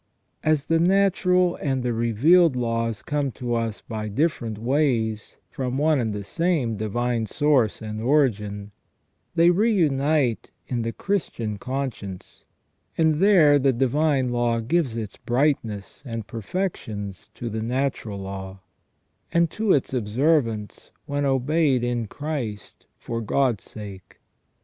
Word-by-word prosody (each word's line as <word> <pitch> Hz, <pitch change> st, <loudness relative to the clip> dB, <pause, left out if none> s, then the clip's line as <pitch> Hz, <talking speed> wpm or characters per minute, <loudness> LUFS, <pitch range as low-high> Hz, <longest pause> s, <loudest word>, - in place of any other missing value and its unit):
As 155 Hz, -2 st, +2 dB
the 165 Hz, 0 st, +2 dB
natural 180 Hz, -1 st, +3 dB
and 135 Hz, -3 st, -1 dB
the 120 Hz, -1 st, 0 dB
revealed 130 Hz, -, +4 dB
laws 115 Hz, -2 st, -1 dB
come 145 Hz, -2 st, -1 dB
to 120 Hz, -1 st, -3 dB
us 115 Hz, -2 st, -2 dB
by 110 Hz, -2 st, -5 dB
different 115 Hz, -2 st, -1 dB
ways 115 Hz, -4 st, 0 dB
from 130 Hz, -3 st, -3 dB
one 150 Hz, 0 st, +3 dB
and 115 Hz, -3 st, -1 dB
the 105 Hz, -1 st, -4 dB
same 140 Hz, -, 0 dB
divine 115 Hz, +2 st, -1 dB
source 140 Hz, -7 st, +1 dB
and 110 Hz, 0 st, -5 dB
origin, 105 Hz, -7 st, +1 dB, 0.6 s
they 170 Hz, +1 st, +6 dB
reunite 155 Hz, -, +2 dB, 0.2 s
in 120 Hz, -2 st, -1 dB
the 115 Hz, 0 st, -2 dB
Christian 115 Hz, -, -2 dB
conscience, 125 Hz, -8 st, -5 dB, 0.5 s
and 160 Hz, -2 st, +3 dB
there 170 Hz, -7 st, +6 dB
the 135 Hz, 0 st, +3 dB
divine 135 Hz, +1 st, +1 dB
law 120 Hz, -1 st, +1 dB
gives 135 Hz, +1 st, 0 dB
its 110 Hz, -3 st, -5 dB
brightness 120 Hz, -6 st, -1 dB
and 115 Hz, -5 st, -5 dB
perfections 110 Hz, -, -4 dB
to 120 Hz, -, -5 dB
the 110 Hz, -1 st, -3 dB
natural 120 Hz, -3 st, -2 dB
law, 95 Hz, 0 st, -7 dB, 0.7 s
and 170 Hz, -1 st, +2 dB
to 215 Hz, +1 st, 0 dB
its 135 Hz, -4 st, +2 dB
observance 115 Hz, -2 st, 0 dB, 0.2 s
when 145 Hz, 0 st, -1 dB
obeyed 135 Hz, 0 st, +2 dB
in 120 Hz, -2 st, -1 dB
Christ 135 Hz, -7 st, -5 dB
for 115 Hz, 0 st, -4 dB
God's 120 Hz, -1 st, 0 dB
sake. 100 Hz, -4 st, -10 dB
125 Hz, 130 wpm, -24 LUFS, 110-150 Hz, 0.7 s, they